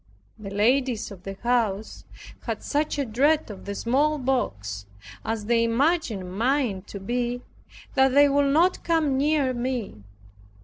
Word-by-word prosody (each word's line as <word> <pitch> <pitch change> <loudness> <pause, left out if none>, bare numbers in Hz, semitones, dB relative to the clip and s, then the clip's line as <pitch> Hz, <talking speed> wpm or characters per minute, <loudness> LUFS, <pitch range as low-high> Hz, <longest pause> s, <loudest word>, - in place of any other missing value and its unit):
The 205 -2 -7
ladies 230 +2 +1
of 190 -3 -10
the 195 +1 -7
house 225 -4 0 0.4
had - - -3
such 295 +1 -1
a 280 - 0
dread 275 +4 +2
of 195 - -11
the 200 0 -4
smallpox, 245 - 0 0.4
as 220 -1 -3
they 230 +1 +3
imagined 230 - 0
mine 240 -3 +1
to 200 - -7
be, 245 +4 -2 0.5
that 265 0 +4
they 285 0 +7
would 280 0 +2
not 345 +5 +3
come 320 -5 +1
near 280 -1 +2
me. 240 - -3
245 Hz, 140 wpm, -25 LUFS, 210-280 Hz, 0.5 s, they